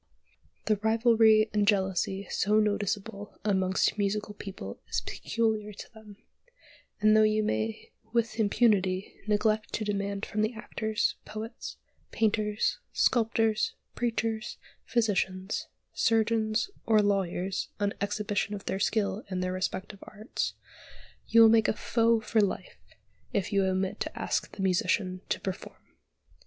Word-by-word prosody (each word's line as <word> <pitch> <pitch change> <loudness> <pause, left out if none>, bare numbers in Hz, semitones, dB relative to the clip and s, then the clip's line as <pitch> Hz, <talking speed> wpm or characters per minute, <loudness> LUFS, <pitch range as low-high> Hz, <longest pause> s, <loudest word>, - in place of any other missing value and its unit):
The 215 -1 +2
rivalry 220 0 +4
and 205 -1 +2
jealousy 190 -1 +1
so 210 +2 +2
noticeable 205 -1 -2
amongst 190 0 +1
musical 210 +1 -1
people 190 - -8
is - - +1
peculiar 215 -1 -1
to - - -11
them; 215 -2 -14 0.8
and, 215 +1 +5
though 215 - +6
you 215 0 +3
may 110 - -2 0.2
with 230 -1 0
impunity 200 -3 +2
neglect 215 0 +1
to 215 - -1
demand 200 0 -2
from 210 - -2
the 215 +2 0
actors, 220 0 -1
poets, 220 +2 -7 0.3
painters, 210 -1 0
sculptors, 225 -2 +2 0.2
preachers, 225 -2 -2 0.3
physicians, 190 -4 0 0.3
surgeons, 225 - +1 0.2
or 215 -2 +5
lawyers 190 -1 -1
an 205 -1 0
exhibition 205 0 -1
of 200 - -9
their 190 - -2
skill 210 0 0
in 185 -1 -2
their 185 0 -1
respective 185 +2 -3
arts, 215 +4 -4 0.7
you 230 0 +7
will - - +9
make 225 -1 +5
a - - +2
foe 230 +1 +2
for 220 0 +1
life 200 - -2 0.5
if 200 0 -1
you 200 -1 +3
omit 190 0 -1
to - - -4
ask - - -2
the 195 - -4
musician 185 -1 +1
to - - 0
perform. 190 -1 -6
210 Hz, 130 wpm, -29 LUFS, 195-220 Hz, 0.8 s, will